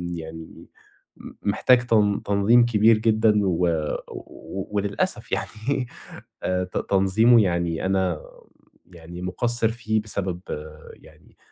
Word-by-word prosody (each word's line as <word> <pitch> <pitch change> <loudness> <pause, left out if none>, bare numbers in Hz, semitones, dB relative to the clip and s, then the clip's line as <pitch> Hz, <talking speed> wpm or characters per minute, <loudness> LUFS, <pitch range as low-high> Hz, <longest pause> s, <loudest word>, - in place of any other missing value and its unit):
يعني 80 0 -10 0.5
م - - -11
محتاج 120 +4 +3
تن 105 -3 +2
تنظيم 100 +4 +4
كبير 110 -1 +4
جدًا، 110 0 +3
و 90 -1 +1 1.0
وللأسف 100 -1 -2
يعني 125 +3 -2 0.6
آآ 90 0 0
ت 90 - -6
تنظيمه 110 +5 +4
يعني 85 -2 -1
أنا 95 -2 +1
امم 75 - -9 0.7
يعني 85 +1 -10
مُقصِر 115 +5 0
فيه 110 -2 -1
بسبب 95 -4 -4 0.6
يعني - - -21
100 Hz, 110 wpm, -23 LUFS, 90-115 Hz, 1.0 s, تنظيم